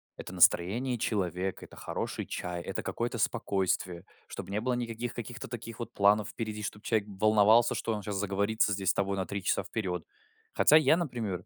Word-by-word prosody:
Это -, -, -8 dB
настроение 120 Hz, +9 st, +3 dB
человека, 95 Hz, -4 st, -2 dB
это -, -, -15 dB
хороший -, -, -4 dB
чай, 90 Hz, -1 st, -4 dB
это 95 Hz, -, -3 dB
какое-то 120 Hz, 0 st, -3 dB
спокойствие, 95 Hz, -3 st, 0 dB, 0.2 s
чтобы -, -, -7 dB
не 100 Hz, +2 st, -1 dB
было 125 Hz, +2 st, 0 dB
никаких 120 Hz, 0 st, -3 dB
каких-то 120 Hz, +2 st, -6 dB
таких 115 Hz, -1 st, -7 dB
вот 120 Hz, -, -6 dB
планов 100 Hz, 0 st, +3 dB
впереди, 110 Hz, -2 st, -5 dB
чтобы 105 Hz, 0 st, -5 dB
человек 110 Hz, -4 st, 0 dB
волновался, 110 Hz, +3 st, +4 dB
что 115 Hz, -, -1 dB
он 105 Hz, -, -3 dB
сейчас 100 Hz, 0 st, -4 dB
заговорится 100 Hz, +1 st, +1 dB
здесь 95 Hz, -1 st, -1 dB
с -, -, +4 dB
тобой 100 Hz, 0 st, 0 dB
на 95 Hz, -2 st, -2 dB
3 100 Hz, -1 st, -4 dB
часа -, -, +1 dB
вперёд. 95 Hz, -5 st, -3 dB, 0.5 s
Хотя 150 Hz, -, +5 dB
я, 160 Hz, +1 st, +6 dB
например, 115 Hz, -, -3 dB
105 Hz, 185 wpm, -30 LUFS, 95-115 Hz, 0.5 s, я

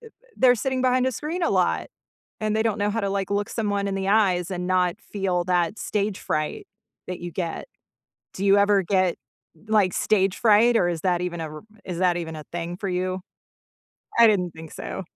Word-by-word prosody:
th 455 Hz, -, -14 dB, 0.2 s
they're 250 Hz, -1 st, +5 dB
sitting 260 Hz, +2 st, -1 dB
behind 255 Hz, 0 st, +3 dB
a 260 Hz, -, 0 dB
screen 320 Hz, -, -4 dB
a -, -, +2 dB
lot, -, -, +1 dB, 0.5 s
and 215 Hz, 0 st, 0 dB
they 220 Hz, -, +2 dB
don't 215 Hz, -2 st, 0 dB
know 205 Hz, +1 st, +1 dB
how 225 Hz, -, -1 dB
to, 200 Hz, -, -1 dB
like, 195 Hz, 0 st, -2 dB
look 205 Hz, 0 st, 0 dB
someone 205 Hz, -3 st, -1 dB
in 195 Hz, -, -2 dB
the 195 Hz, 0 st, -2 dB
eyes 190 Hz, -5 st, +2 dB
and 180 Hz, -1 st, -3 dB
not 180 Hz, 0 st, +1 dB
feel 190 Hz, -5 st, -2 dB
that 180 Hz, +2 st, 0 dB
stage 205 Hz, -1 st, -2 dB
fright 155 Hz, -, -3 dB, 0.4 s
that 180 Hz, -, -4 dB
you 175 Hz, -1 st, -6 dB
get. 170 Hz, -1 st, -3 dB, 0.7 s
Do 195 Hz, -, -4 dB
you 195 Hz, +1 st, +6 dB
ever 200 Hz, -1 st, +4 dB
get, 185 Hz, -1 st, +1 dB, 0.5 s
like, 205 Hz, -4 st, +3 dB
stage 195 Hz, -2 st, +2 dB
fright, 230 Hz, +1 st, +5 dB
or 175 Hz, -5 st, +3 dB
is 170 Hz, -2 st, -2 dB
that 180 Hz, -2 st, +1 dB
even 175 Hz, -2 st, -3 dB
a 160 Hz, -, -4 dB
r -, -, -9 dB, 0.2 s
is 175 Hz, -2 st, -5 dB
that 180 Hz, -2 st, +2 dB
even 160 Hz, -2 st, -5 dB
a 155 Hz, -, -8 dB
thing 175 Hz, 0 st, -4 dB
for 195 Hz, 0 st, -4 dB
you? 185 Hz, +1 st, -2 dB, 1.0 s
I 230 Hz, -, +9 dB
didn't 180 Hz, -5 st, +1 dB
think 160 Hz, -1 st, -11 dB
so. -, -, -6 dB
195 Hz, 210 wpm, -24 LUFS, 180-215 Hz, 1.0 s, I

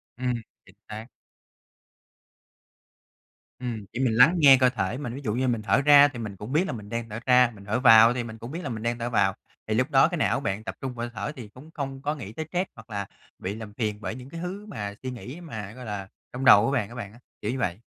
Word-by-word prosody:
Ừm, 125 Hz, 0 st, -1 dB, 0.3 s
chính 95 Hz, -, -19 dB
xác. 110 Hz, +2 st, -7 dB, 2.5 s
Ừm, 115 Hz, -5 st, -5 dB
thì 120 Hz, -, -4 dB
mình 125 Hz, -4 st, +2 dB
lắng 125 Hz, +10 st, +6 dB
nghe 140 Hz, -4 st, +8 dB
cơ 130 Hz, -1 st, +5 dB
thể 110 Hz, -1 st, -2 dB
mình, 130 Hz, -4 st, -5 dB
ví 140 Hz, -, -7 dB
dụ 105 Hz, -, -1 dB
như 130 Hz, +3 st, 0 dB
mình 115 Hz, -3 st, 0 dB
thở 115 Hz, -, +2 dB
ra 145 Hz, 0 st, +8 dB
thì 135 Hz, -4 st, -8 dB
mình 105 Hz, -4 st, -5 dB
cũng 105 Hz, +6 st, -8 dB
biết 160 Hz, +6 st, +2 dB
là -, -, -3 dB
mình 105 Hz, -3 st, -8 dB
đang 115 Hz, 0 st, -4 dB
thở 110 Hz, +2 st, -5 dB
ra, 125 Hz, -1 st, +5 dB
mình 100 Hz, -1 st, -14 dB
thở 110 Hz, +4 st, 0 dB
vào 115 Hz, -3 st, +8 dB
ấy 120 Hz, -, +2 dB
thì 125 Hz, -1 st, -2 dB
mình 110 Hz, -1 st, -8 dB
cũng 115 Hz, +3 st, -9 dB
biết 165 Hz, -, -5 dB
là 145 Hz, -, -4 dB
mình 110 Hz, -3 st, -5 dB
đang 120 Hz, 0 st, -1 dB
thở 120 Hz, -, -2 dB
vào, 120 Hz, -, +2 dB, 0.3 s
thì 110 Hz, -, 0 dB
lúc 130 Hz, +7 st, +1 dB
đó 135 Hz, +2 st, +6 dB
cái 175 Hz, 0 st, -3 dB
não 145 Hz, -, +1 dB
bạn 105 Hz, -6 st, -3 dB
tập -, -, -6 dB
trung 130 Hz, -2 st, -4 dB
vào 120 Hz, -1 st, -5 dB
hơi 120 Hz, -, -12 dB
thở 150 Hz, -, -3 dB
thì 120 Hz, -5 st, -8 dB
cũng 130 Hz, +9 st, -15 dB
không 135 Hz, -2 st, -5 dB
có 150 Hz, +2 st, -1 dB
nghĩ 110 Hz, -8 st, -8 dB
tới 160 Hz, -, -5 dB
stress 180 Hz, +1 st, 0 dB
hoặc 110 Hz, 0 st, -14 dB
là 100 Hz, -2 st, -3 dB, 0.3 s
bị 100 Hz, +3 st, -4 dB
làm 110 Hz, -2 st, -9 dB
phiền 105 Hz, -3 st, -3 dB
bởi 95 Hz, +1 st, -4 dB
những 130 Hz, +1 st, -10 dB
cái 165 Hz, -, -8 dB
thứ 190 Hz, +4 st, -5 dB
mà 105 Hz, -, -5 dB
suy 130 Hz, -, -3 dB
nghĩ 125 Hz, +7 st, -9 dB
mà, 110 Hz, -, -7 dB
gọi 125 Hz, 0 st, -10 dB
là, 100 Hz, -2 st, -5 dB, 0.3 s
trong 130 Hz, +2 st, -4 dB
đầu 105 Hz, -3 st, +8 dB
của 135 Hz, -, 0 dB
bạn 120 Hz, -8 st, 0 dB
á 120 Hz, -, -11 dB
bạn 105 Hz, -5 st, -7 dB
á, 120 Hz, -, -16 dB, 0.2 s
kiểu 105 Hz, -, -2 dB
như 130 Hz, -, -4 dB
vậy. 95 Hz, -5 st, -1 dB
120 Hz, 275 wpm, -26 LUFS, 110-135 Hz, 2.5 s, nghe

